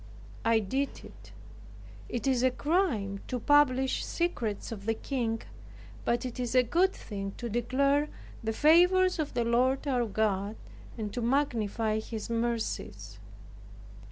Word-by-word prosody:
I 230 0 +4
did 265 +7 -2
it. - - -15 0.8
It 240 0 -3
is 260 -3 +2
a 260 - +4
crime 255 - 0
to 250 - -2
publish 265 -1 +3
secrets 235 - -2
of 205 -2 -7
the 225 - +2
King; 230 -3 -2 0.6
but 240 +2 +1
it 250 0 -6
is 245 0 -2
a 255 - +6
good 350 +10 +2
thing 195 - -6
to 240 - -4
declare 275 +6 +1 0.3
the 220 - 0
favors 355 +7 +5
of 300 -5 -2
the 240 -1 +1
Lord 255 +4 +2
our 245 -4 +1
God, 205 -1 0 0.4
and 210 -3 -4
to 245 - -3
magnify 230 -4 0
His 220 0 -6
mercies. 230 -1 -3
240 Hz, 140 wpm, -29 LUFS, 220-275 Hz, 0.8 s, a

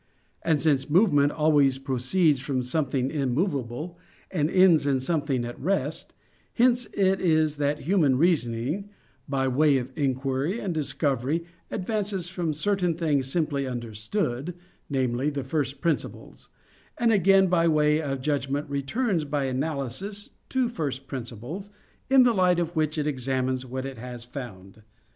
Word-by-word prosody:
And 160 -3 +2
since 140 -1 +1
movement 145 -5 +4
always 145 -4 +3
proceeds 135 +4 +1
from 130 -1 -2
something 135 -1 0
immovable, 140 - -2 0.3
and 155 -4 0
ends 180 -5 +5
in 135 -2 +2
something 140 -3 -1
at 120 - -7
rest; 160 -1 -2 0.4
hence 245 0 +3
it 190 -1 +2
is 155 -3 +2
that 145 +1 0
human 155 -6 +2
reasoning, 150 - 0 0.4
by 135 -1 0
way 140 +2 +3
of 130 0 -4
inquiry 135 - -1
and 190 -6 -2
discovery, 145 +1 0 0.2
advances 200 -3 -2
from 175 -5 -2
certain 180 0 +1
things 150 -5 0
simply 145 -5 0
understood 120 - -3 0.3
namely, 130 0 0
the 140 -2 -3
first 140 0 -2
principles; 165 -4 -3 0.5
and, 235 -2 +3
again, 195 0 +5
by 170 -2 +2
way 150 -1 +3
of 135 -3 -3
judgment 145 0 -1
returns 165 - 0
by 145 -1 -1
analysis 145 - -3 0.2
to 260 -2 +1
first 140 - -4
principles, 135 - -6 0.4
in 265 -1 +7
the 245 -1 +4
light 180 -3 +3
of 175 0 -2
which 155 0 0
it 150 - 0
examines 130 -2 -1
what 130 +1 -4
it 135 -4 -7
has 120 0 -7
found. 110 -6 -9
145 Hz, 140 wpm, -26 LUFS, 130-175 Hz, 0.5 s, in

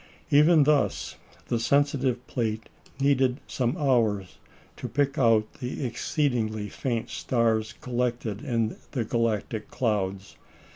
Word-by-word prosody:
Even 150 +2 +6
thus, 150 0 +1 0.3
the 120 - -1
sensitive 135 -1 +1
plate 110 -2 -3 0.3
needed 135 -1 +2
some 125 +5 -1
hours 115 - +1 0.4
to - - -5
pick 140 +1 0
out 115 -4 +3
the 130 +1 -4
exceedingly 115 -5 -1
faint 120 +1 -3
stars 110 -3 0
collected 120 -3 -2
in 115 -6 -1 0.2
the 125 -5 0
galactic 110 -1 -1
clouds. 100 -6 -2
120 Hz, 110 wpm, -27 LUFS, 110-135 Hz, 0.4 s, Even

